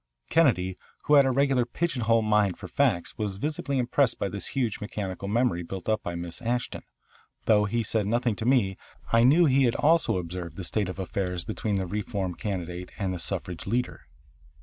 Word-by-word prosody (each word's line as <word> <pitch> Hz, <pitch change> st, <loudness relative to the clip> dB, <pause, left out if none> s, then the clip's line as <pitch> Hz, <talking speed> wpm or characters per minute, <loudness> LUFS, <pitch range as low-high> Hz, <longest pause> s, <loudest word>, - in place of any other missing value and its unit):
Kennedy, 95 Hz, -, +3 dB, 0.2 s
who 150 Hz, -, +1 dB
had 140 Hz, -2 st, +7 dB
a -, -, +2 dB
regular 135 Hz, -1 st, +3 dB
pigeon 135 Hz, +3 st, -2 dB
hole 115 Hz, 0 st, +3 dB
mind 105 Hz, -3 st, +2 dB
for -, -, -8 dB
facts, 85 Hz, +5 st, 0 dB
was 100 Hz, -3 st, -2 dB
visibly 145 Hz, +2 st, -2 dB
impressed 125 Hz, +1 st, +2 dB
by 100 Hz, -, -2 dB
this 100 Hz, 0 st, -5 dB
huge 120 Hz, -6 st, 0 dB
mechanical 100 Hz, -2 st, -4 dB
memory 115 Hz, -4 st, +1 dB
built 90 Hz, +1 st, -7 dB
up 110 Hz, -1 st, +1 dB
by 85 Hz, -, -4 dB
Miss 85 Hz, +4 st, -5 dB
Ashton. 120 Hz, +1 st, -2 dB, 0.6 s
Though 105 Hz, -2 st, +4 dB
he 115 Hz, +3 st, 0 dB
said 105 Hz, -1 st, 0 dB
nothing 120 Hz, 0 st, +1 dB
to 110 Hz, -, -4 dB
me 105 Hz, -8 st, +3 dB, 0.4 s
I 115 Hz, -, +6 dB
knew 150 Hz, +8 st, +6 dB
he 135 Hz, -2 st, +4 dB
had 120 Hz, -, +1 dB
also 160 Hz, -, +3 dB
observed 90 Hz, 0 st, -5 dB
the 95 Hz, -, -5 dB
state 100 Hz, +2 st, -1 dB
of 90 Hz, -, -6 dB
affairs 90 Hz, -2 st, -3 dB
between 110 Hz, -1 st, -2 dB
the 95 Hz, -1 st, 0 dB
reform 100 Hz, -1 st, -3 dB
candidate 90 Hz, -3 st, -4 dB
and 95 Hz, -3 st, -1 dB
the 90 Hz, -, -5 dB
suffrage 90 Hz, -1 st, -2 dB
leader. 120 Hz, +4 st, -2 dB
105 Hz, 195 wpm, -27 LUFS, 95-125 Hz, 0.6 s, had